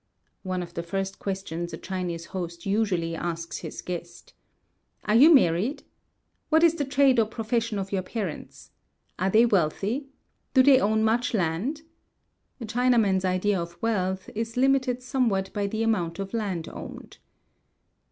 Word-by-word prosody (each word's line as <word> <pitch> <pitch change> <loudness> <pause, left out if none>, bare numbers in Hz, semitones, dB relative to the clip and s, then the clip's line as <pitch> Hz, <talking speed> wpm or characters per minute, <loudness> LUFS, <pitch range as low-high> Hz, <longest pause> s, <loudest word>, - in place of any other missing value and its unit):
[One 185 -2 -3
of 175 - -11
the 170 - -3
first 195 +3 -4
questions 175 -3 -4
a - - -4
Chinese 180 -3 -4
host 170 -2 -5
usually 195 -5 0
asks 170 0 -4
his - - -7
guest.] 170 -1 -7 0.7
Are 210 - 0
you 280 +9 +8
married? 230 - +3 0.7
What 320 +1 +4
is 335 -1 +6
the 300 -4 -2
trade 270 -2 +4
or 220 - +3
profession 230 0 -2
of 195 0 -4
your 195 -2 0
parents? 185 -3 -6 0.5
Are 190 +2 +1
they 220 +4 +5
wealthy? 205 - 0 0.5
Do 260 - +7
they 270 -1 +7
own 220 -1 +2
much 230 +2 +1
land?" 200 - -1 0.8
(A 235 - -5
Chinaman's 225 -5 +2
idea 185 +1 +1
of 170 0 -8
wealth 190 -4 -1
is 225 +2 -4
limited 260 -1 +2
somewhat 230 -8 0
by 205 -1 -1
the 220 +2 -2
amount 175 -7 0
of 195 +1 -5
land 195 -8 -2
owned.) - - -9
200 Hz, 150 wpm, -26 LUFS, 180-235 Hz, 0.8 s, you